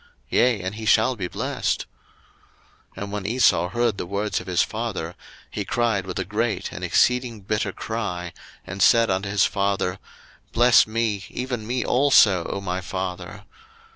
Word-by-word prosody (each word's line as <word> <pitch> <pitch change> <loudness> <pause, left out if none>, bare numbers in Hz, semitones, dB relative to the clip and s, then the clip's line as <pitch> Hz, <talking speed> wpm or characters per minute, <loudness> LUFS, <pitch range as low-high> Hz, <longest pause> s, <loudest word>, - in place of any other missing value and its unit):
yea, 120 -4 +3
and 95 +1 -3
he 110 +1 -8
shall 115 +4 +4
be 95 -5 -4
blessed. - - -2 1.1
01:027:034 100 - -4
And 100 - -7
when 105 -1 -4
Esau 115 -6 +3
heard 120 0 0
the - - -4
words 100 +2 -2
of - - -13
his 90 -2 +2
father, 110 -7 -4 0.4
he - - -3
cried 115 -6 0
with 90 - -5
a 95 - -2
great 110 +4 -2
and - - -8
exceeding 125 -3 +1
bitter 105 +1 -1
cry, 90 -6 -4 0.3
and 95 +2 -6
said 115 +1 +5
unto 95 +1 -1
his 100 0 +3
father, 100 -2 -1 0.5
Bless 120 -1 +5
me, 110 -3 -1
even 125 -4 -4
me 125 +1 -1
also, 115 -9 +4
O - - -3
my 95 -1 -3
father. 95 -1 -5
105 Hz, 165 wpm, -23 LUFS, 95-115 Hz, 1.1 s, said